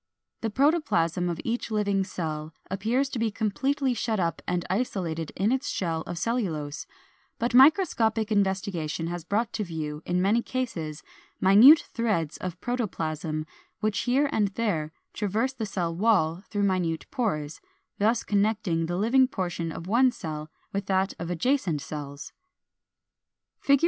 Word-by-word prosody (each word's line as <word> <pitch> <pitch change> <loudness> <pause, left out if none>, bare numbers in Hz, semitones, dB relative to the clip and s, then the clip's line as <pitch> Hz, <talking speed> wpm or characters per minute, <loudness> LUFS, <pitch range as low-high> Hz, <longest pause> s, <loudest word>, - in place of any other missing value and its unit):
The 225 - -1
protoplasm 205 - +2
of 170 - -3
each 235 +1 -2
living 205 -3 +1
cell 160 -4 -5 0.2
appears 225 +8 +1
to 255 - -4
be 225 0 +1
completely 260 +6 0
shut 225 -2 -1
up 170 -2 -1
and 180 -1 -1
isolated 180 -6 -2
in 205 +4 +1
its 265 +2 0
shell 165 -3 -1
of 175 - -5
cellulose; 165 -10 -2 0.5
but 235 +1 -1
microscopic 240 - +4
investigation 190 -5 0
has 175 0 -4
brought 220 +6 -1
to 215 - -1
view, 155 -4 -5
in 180 0 +1
many 205 +6 +3
cases, 175 -13 -4 0.4
minute 225 +12 +8
threads 205 -10 0
of 180 -1 -5
protoplasm 160 -10 -2 0.3
which 215 0 0
here 265 +4 +2
and 210 -2 +2
there 165 -10 -1 0.2
traverse 220 +5 -1
the 225 -5 -4
cell 170 -4 -2
wall 180 -4 +2
through 205 -2 -1
minute 180 -4 0
pores, 160 - -2 0.4
thus 225 +3 +2
connecting 200 -5 +1
the 175 +1 -2
living 250 +6 +4
portion 175 -7 -3
of 165 - -7
one 240 +7 +4
cell 155 -6 -6 0.2
with 200 -1 -2
that 190 0 +1
of 170 - -4
adjacent 175 - +1
cells. 140 -1 -7 1.3
(See 280 - +3
Fig. 280 - +6
195 Hz, 150 wpm, -27 LUFS, 165-230 Hz, 1.3 s, minute